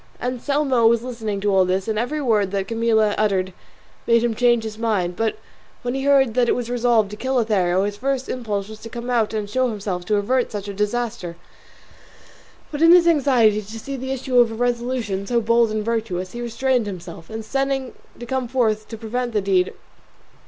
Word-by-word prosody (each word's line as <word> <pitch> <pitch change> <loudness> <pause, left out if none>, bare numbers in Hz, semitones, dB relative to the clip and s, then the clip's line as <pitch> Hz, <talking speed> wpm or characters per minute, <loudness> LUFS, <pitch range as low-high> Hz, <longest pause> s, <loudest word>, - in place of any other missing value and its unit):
Anselmo 255 -1 +1
was 235 0 +3
listening 225 -5 -4
to 205 0 +1
all 190 -1 +5
this, 185 +2 -1
and 215 -1 -1
every 250 +6 -2
word 215 -8 +1
that 195 0 -2
Camilla 225 -2 +2
uttered 190 -3 +1 0.5
made 235 0 +4
him 240 -1 +1
change 240 0 +3
his 220 0 -6
mind; 200 -6 0
but 225 +2 -1 0.5
when 245 0 -2
he 270 0 -3
heard 270 -4 +4
that 245 0 +2
it - - +3
was 245 -1 -4
resolved 235 -4 +2
to - - -6
kill 260 +5 -2
Lothario 195 -6 +2
his 205 0 -3
first 265 +2 -2
impulse 210 -5 -3
was 215 0 -10
to 230 - -9
come 240 +1 -5
out 230 -3 +1
and 215 -2 -3
show 255 +4 0
himself 195 -5 -4
to 210 - +1
avert 245 +5 0
such 205 -2 -5
a 200 - -5
disaster; 210 -3 -2 1.4
but 295 0 -4
in 330 +1 +7
his 350 -1 +7
anxiety 250 -9 +4
to 215 +2 -9
see 275 +5 -6
the 265 0 -5
issue 260 -1 +1
of 235 -2 +4
a - - -5
resolution 235 -4 -2
so 240 +2 +2
bold 230 0 +3
and 215 -1 -2
virtuous 215 -6 -2
he 240 - -6
restrained 240 0 0
himself, 175 -3 -8
intending 265 +4 -2 0.3
to 240 - -7
come 260 0 -2
forth 245 -3 +2
in 215 - -4
time - - -30
to 225 - -7
prevent 240 +2 -3
the 210 - +1
deed. 190 -2 +2
230 Hz, 210 wpm, -22 LUFS, 205-250 Hz, 1.4 s, in